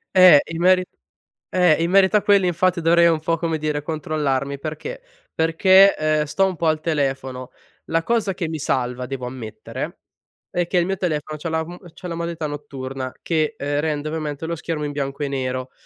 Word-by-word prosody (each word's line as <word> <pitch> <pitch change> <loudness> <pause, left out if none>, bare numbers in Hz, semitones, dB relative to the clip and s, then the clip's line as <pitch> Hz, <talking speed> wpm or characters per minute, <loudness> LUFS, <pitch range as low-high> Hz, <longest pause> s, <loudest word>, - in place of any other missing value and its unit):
Eh, 185 -6 +9
in 165 +1 -4
meri 185 0 +5 0.7
eh, 175 -3 +3
in 170 - 0
merito 195 +2 +5
a - - +1
quelli 200 -3 +4
infatti 175 0 +1
dovrei 170 +1 +5
un 165 -2 +2
po' 165 +1 0
come 165 -1 -1
dire 150 -1 -2
controllarmi, 145 -3 -2
perché: 155 - -6 0.3
perché, 190 +4 +5
ehm, 155 0 +1
sto 195 +6 +1
un 185 - -3
po' 165 - -3
al 155 0 +1
telefono. 135 -5 -2 0.3
La 165 0 0
cosa 225 -3 0
che 175 -3 -3
mi 160 - -3
salva 125 -2 -1
devo 125 -1 -5
ammettere 120 -4 -7 0.5
è 175 -1 0
che 180 - 0
il 175 - +3
mio 195 +1 -1
telefono 155 -3 -3
c'ha 165 - -4
la 160 0 0
m 175 +1 -9 0.2
c'ha 180 +1 -9
la 170 - -4
modalità 170 -1 -4
notturna 135 -3 -5
che, 155 -3 0
ehm, 145 +1 -1
rende 150 -1 -2
ovviamente 155 -1 -4
lo 170 +1 -2
schermo 160 -1 -4
in 145 - -2
bianco 140 0 -3
e - - 0
nero, 130 -1 -3
155 Hz, 195 wpm, -22 LUFS, 145-170 Hz, 0.7 s, Eh